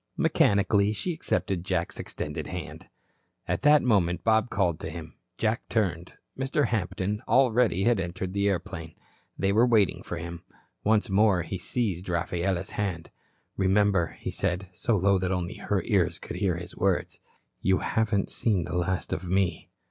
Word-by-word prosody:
Mechanically 100 +1 +3
she 175 - -3
accepted 95 - -1
Jack's 90 -2 -2
extended - - -5
hand. - - -7 0.6
At - - -1
that 150 +1 +6
moment, 90 -8 +2
Bob 110 +1 +3
called 90 -6 0
to - - -5
him. 80 -1 -8 0.2
Jack 110 +1 -1
turned. 90 -6 -1 0.2
Mr. 135 0 0
Hampton 100 0 -1
already 125 -7 +3
had 120 -2 +3
entered 90 +1 -4
the 100 0 +2
airplane. 85 -3 -4 0.4
They 95 +2 +1
were 110 +3 +5
waiting 110 -7 +3
for - - -5
him. 85 0 -6 0.4
Once 110 0 +3
more 100 -2 +3
he 95 - -5
seized 95 -3 -2
Rafaela's 85 +1 -1
hand. 95 -5 -3 0.5
"Remember," 95 -3 +2
he - - -4
said, 95 0 -2
so 115 +4 0
low 100 +1 +3
that 90 0 -1
only 90 -1 -2
her - - -1
ears - - +1
could - - -7
hear 95 -4 +1
his 90 +1 -8
words, 95 -1 0 0.4
"you 95 0 +3
haven't 110 -3 0
seen 100 -7 +1
the 80 - -5
last 90 +1 -1
of 90 - -4
me." 90 -2 0
95 Hz, 160 wpm, -27 LUFS, 90-105 Hz, 0.6 s, that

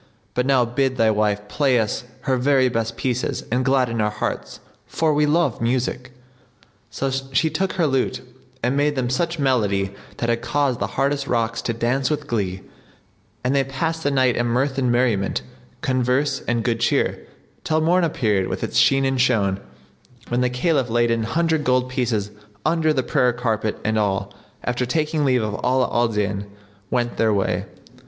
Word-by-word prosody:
But 125 +1 0
now 130 -3 +4
bid 130 +2 0
thy 110 -2 +4
wife 105 -1 0
play 135 -2 +2
us 110 +2 -2 0.2
her 130 -1 +1
very 130 0 +3
best 115 -1 -2
pieces 125 -1 -1
and 125 +2 +1
gladden 125 -4 +1
our 105 - +2
hearts 105 - -4 0.3
for 160 -2 +1
we 150 0 +2
love 150 -6 +1
music." 125 +1 -1 0.8
So 135 0 -2
she 135 +3 0
took 190 0 -1
her 175 -3 +1
lute 135 -3 0 0.4
and 125 +3 +1
made 145 +1 +2
them 125 -2 -1
such 170 +6 0
melody 105 -9 +1 0.2
that 120 - -2
had 115 0 0
caused 140 -2 0
the 100 - -1
hardest 140 0 0
rocks 115 -1 0
to 115 - -2
dance 125 +3 0
with 150 -1 -2
glee; 95 -8 -2 0.8
and 125 +2 +1
they 135 - +3
passed 160 +5 -2
the 145 - +1
night 130 -3 +2
in 120 - 0
mirth 130 +3 0
and 125 -2 +1
merriment, 120 -5 +1 0.4
converse 130 +2 +1
and 120 -1 0
good 115 -2 0
cheer, 120 - 0 0.4
till 155 0 +1
morn 175 +3 +3
appeared 105 - +1
with - - -4
its - - +1
sheen 135 0 +4
and 135 -1 +1
shone, 100 -7 +2 0.7
when 120 +1 +1
the 125 - +2
Caliph 130 0 +1
laid 120 0 +2
an 115 0 +1
hundred 160 +3 +1
gold 125 -1 +2
pieces 110 -5 -1 0.3
under 160 0 +2
the 135 -4 +1
prayer 125 0 +2
carpet 110 -3 -1
and 110 0 +1
all, 100 -1 -1 0.3
after 125 0 -1
taking 155 +3 0
leave 130 -4 +2
of 105 -1 -2
Ala 130 -1 +2
al 120 0 +3
Din, 105 -2 -2 0.4
went 120 -1 -1
their 110 -1 +3
way. 100 -2 0
125 Hz, 180 wpm, -22 LUFS, 115-140 Hz, 0.8 s, now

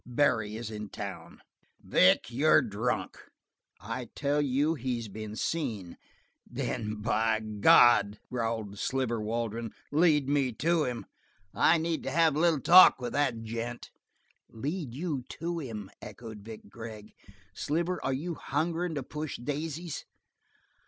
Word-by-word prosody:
Barry 120 -4 +1
is 115 0 -6
in 105 -1 -6
town!" - - -8 0.4
"Vic, 95 +5 +3
you're 145 +4 +4
drunk." 115 +2 -2 0.6
"I 115 +3 -6
tell 145 0 +1
you, 145 +3 +1
he's 125 -5 -3
been 110 +1 -7
seen 110 - -3 0.3
" - - -37
"Then 110 -3 -3
by 110 -1 +2
God," 105 0 +5
growled 115 -4 -3
Sliver 125 -4 -1
Waldron, 115 0 -3 0.2
"lead 150 -2 +3
me 140 -3 +1
to 165 +5 +1
him. 120 -2 -4 0.5
I 170 - +4
need 165 0 -1
to - - -4
have 165 -3 +3
a - - 0
little 165 -4 +3
talk 180 0 +8
with 120 -2 -4
that 130 -6 0
gent." 115 +2 -5 0.6
"Lead 140 +2 -4
you 150 -3 -2 0.2
to 170 +1 -3
him?" 110 -9 -7
echoed 110 -3 -9
Vic 110 +1 -10
Gregg. 110 0 -10 0.4
"Sliver, 170 - -2
are 135 - 0
you 155 +7 -3
hungerin' 165 +3 -2
to 140 - -3
push 150 +3 -5
daisies?" 150 +5 -4
125 Hz, 140 wpm, -29 LUFS, 110-150 Hz, 0.6 s, talk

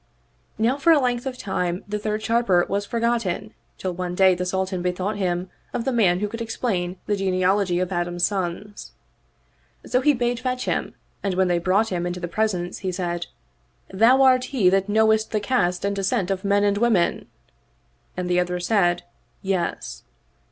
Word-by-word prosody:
Now 235 +5 +1
for 310 +4 +4
a 320 - +7
length 245 -1 -1
of 255 -1 -4
time 180 -4 -2
the 210 +1 -3
third 215 0 -2
Sharper 220 -7 +2
was 200 +1 -2
forgotten 230 -3 -1 0.2
till 185 -1 -3
one 180 0 -4
day 190 0 +5
the 180 0 -3
Sultan 190 0 -2
bethought 180 +3 -2
him 180 -1 -2 0.2
of 235 - -2
the 265 - +1
man 195 -7 +2
who 210 - 0
could 230 +3 -7
explain 190 -6 -2
the 210 - 0
genealogy 190 -1 +1
of 185 0 -2
Adam's 175 0 0
sons. 200 +1 -4 0.9
So 250 - +1
he 290 +1 +4
bade 240 0 -1
fetch 255 -1 -2
him - - -2 0.3
and 195 -2 -1
when 185 0 +2
they 175 -1 +2
brought 195 +6 +2
him 175 -1 -2
into 175 0 -4
the 175 - -4
presence 180 -2 -1
he 190 -2 -3
said, 175 -1 -3 0.3
" - - -26
Thou 240 +7 +5
art 255 -1 +5
he 245 -9 +2
that 195 +1 +1
knowest 220 +1 +3
the 215 - 0
caste 200 -5 0
and 200 0 0
descent 195 0 0
of 190 -1 -2
men 200 0 +2
and 205 0 +2
women? 220 -7 +1 0.4
" - - -40
and 180 -1 -2
the 180 0 +2
other 180 0 -1
said, 175 -2 +1 0.2
" 120 - -41
Yes." 190 -3 -2
195 Hz, 190 wpm, -23 LUFS, 180-225 Hz, 0.9 s, a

